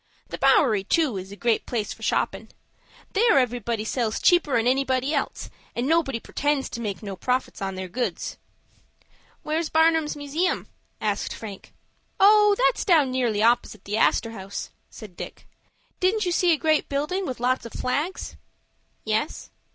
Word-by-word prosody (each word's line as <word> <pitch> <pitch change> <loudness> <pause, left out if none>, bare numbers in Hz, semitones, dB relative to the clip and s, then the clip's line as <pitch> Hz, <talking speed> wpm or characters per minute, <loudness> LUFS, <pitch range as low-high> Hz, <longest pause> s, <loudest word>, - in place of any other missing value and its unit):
The - - -6
Bowery, 215 -8 +4
too, 290 - +1
is 190 +1 -7
a - - -8
great 230 +1 0
place 225 -4 -2
for - - -18
shoppin'. - - -1 0.6
There 440 -5 +4
everybody 235 -3 0
sells 225 -2 -1
cheaper'n 290 -10 +3
anybody 265 +2 +1
else, 280 - -3 0.2
and 240 - -1
nobody 295 -5 +1
pretends 290 +3 -1
to 235 - -5
make 210 -2 -4
no 200 -2 -5
profit 250 +4 -2
on 195 -1 -3
their 185 0 -5
goods." 245 +7 -3 1.0
"Where's 310 +1 -1
Barnum's 320 -1 +3
Museum?" 300 +6 -1 0.3
asked - - -2
Frank. 205 -4 -9 0.5
"Oh, 420 +1 +6
that's - - +2
down 310 -9 +4
nearly 235 -5 0
opposite 235 -3 +1
the 210 +2 -2
Astor 225 0 +2
House," 195 -2 -7 0.2
said 205 -5 -12
Dick. - - -9 0.5
"Didn't 395 +3 +2
you 355 - 0
see 350 0 +3
a 320 - +3
great 310 0 +1
building 305 +7 -1
with 255 - -5
lots 250 -1 0
of - - -13
flags?" 295 +8 -3 0.7
"Yes." 220 +7 -2
255 Hz, 155 wpm, -25 LUFS, 225-320 Hz, 1.0 s, Oh